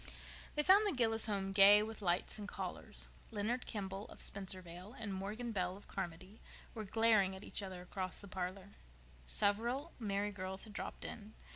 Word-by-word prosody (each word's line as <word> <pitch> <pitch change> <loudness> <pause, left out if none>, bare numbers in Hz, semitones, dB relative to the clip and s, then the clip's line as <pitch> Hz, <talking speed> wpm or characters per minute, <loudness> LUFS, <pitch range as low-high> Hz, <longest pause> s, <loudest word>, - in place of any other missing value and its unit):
They 300 - +2
found 400 +5 +7
the 395 - +2
Gillis 225 -3 +5
home 195 -2 -1
gay 200 +1 +8
with 220 0 -6
lights 180 +3 0
and 205 - -5
callers. - - -6 0.2
Leonard 230 +3 -1
Kimball, 195 -1 -4
of - - -12
Spencervale, 185 +1 -2
and 215 -3 -4
Morgan 210 +5 -3
Bell, 185 -2 -1
of 205 - -15
Carmody, 185 +2 -6 0.3
were 220 -2 -5
glaring 215 -2 +4
at 190 - -9
each - - -4
other 185 -2 -6
across 185 0 -4
the 200 - -9
parlor. 185 +1 -4 0.6
Several 235 - +1
merry 205 -2 0
girls 190 -1 -3
had 215 - -8
dropped - - -5
in. 215 0 -7
200 Hz, 170 wpm, -37 LUFS, 190-220 Hz, 0.6 s, gay